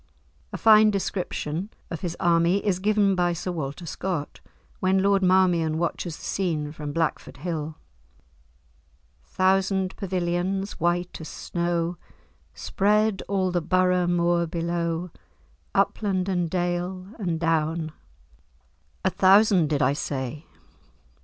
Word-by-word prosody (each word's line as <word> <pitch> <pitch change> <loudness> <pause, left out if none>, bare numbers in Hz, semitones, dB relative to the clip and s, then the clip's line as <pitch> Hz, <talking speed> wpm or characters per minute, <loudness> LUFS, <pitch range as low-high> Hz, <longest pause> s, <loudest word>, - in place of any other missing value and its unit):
A - - -4
fine 215 -1 +6
description 185 -3 -3 0.2
of 165 - -5
his 175 -2 -4
army 170 +2 +3
is 190 -3 +1
given 205 0 +3
by 175 -1 +1
Sir 175 +2 -4
Walter 155 0 -5
Scott, 170 -2 -4 0.4
when 190 +1 +2
Lord 200 0 +3
Marmion 180 -4 +3
watches 170 -1 -2
the - - -14
scene 160 -6 -2
from 150 -1 -6
Blackford 160 -2 -2
Hill. 155 0 -4 1.5
"Thousand 190 - +1
pavilions, 185 +1 -2
white 175 +1 -1
as 160 - -7
snow, 170 0 -2 0.6
Spread 210 - +1
all 190 -2 0
the 175 -1 0
Borough 180 +1 +2
moor 170 -1 +2
below, 170 0 -2 0.6
Upland, 190 -3 +1
and 175 -3 0
dale, 180 +1 -2
and 175 -5 -2
down:— 160 -1 0 1.1
A 190 - +3
thousand, 190 -4 +5
did 145 -2 +1
I 130 +2 +3
say? 140 +1 -4
175 Hz, 120 wpm, -25 LUFS, 165-190 Hz, 1.5 s, fine